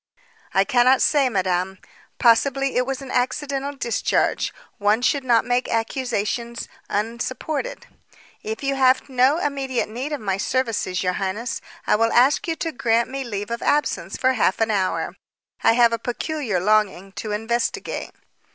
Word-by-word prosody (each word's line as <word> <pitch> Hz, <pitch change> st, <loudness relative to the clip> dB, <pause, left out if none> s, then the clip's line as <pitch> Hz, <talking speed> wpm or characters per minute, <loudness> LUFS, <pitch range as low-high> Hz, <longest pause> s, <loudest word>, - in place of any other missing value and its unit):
"I 195 Hz, -, +5 dB
cannot 250 Hz, +4 st, +4 dB
say, 280 Hz, -3 st, +3 dB
madame. 190 Hz, -2 st, -1 dB, 0.4 s
Possibly 270 Hz, +3 st, +3 dB
it 250 Hz, +1 st, +1 dB
was 270 Hz, 0 st, -3 dB
an 265 Hz, -, -8 dB
accidental 275 Hz, +2 st, -1 dB
discharge. 235 Hz, -4 st, 0 dB, 0.3 s
One 210 Hz, +3 st, +2 dB
should 280 Hz, +2 st, +2 dB
not 235 Hz, -3 st, +3 dB
make 245 Hz, +1 st, 0 dB
accusations 235 Hz, 0 st, -2 dB, 0.2 s
unsupported. 250 Hz, -, -3 dB, 0.6 s
If 440 Hz, -6 st, -5 dB
you 275 Hz, 0 st, +1 dB
have 260 Hz, 0 st, +3 dB
no 260 Hz, +3 st, +3 dB
immediate 275 Hz, -7 st, -1 dB
need 250 Hz, +7 st, -4 dB
of 295 Hz, -, -2 dB
my 195 Hz, -3 st, -1 dB
services, 220 Hz, -5 st, -1 dB
your 180 Hz, 0 st, +1 dB
highness, 210 Hz, +5 st, -3 dB, 0.2 s
I -, -, +3 dB
will 230 Hz, +1 st, +2 dB
ask 260 Hz, +8 st, +4 dB
you 330 Hz, -, 0 dB
to 325 Hz, 0 st, -3 dB
grant 235 Hz, -2 st, +1 dB
me 270 Hz, 0 st, -3 dB
leave 205 Hz, -3 st, -5 dB
of 235 Hz, -, -3 dB
absence 295 Hz, 0 st, 0 dB
for 260 Hz, 0 st, +2 dB
half 215 Hz, -6 st, +1 dB
an 225 Hz, 0 st, +2 dB
hour. 190 Hz, -3 st, -1 dB, 0.5 s
I -, -, +6 dB
have 235 Hz, -1 st, +4 dB
a 230 Hz, -, -1 dB
peculiar 245 Hz, -, -2 dB
longing 195 Hz, -1 st, +1 dB
to 215 Hz, -, -5 dB
investigate." 225 Hz, +3 st, -2 dB
240 Hz, 155 wpm, -22 LUFS, 215-270 Hz, 0.6 s, I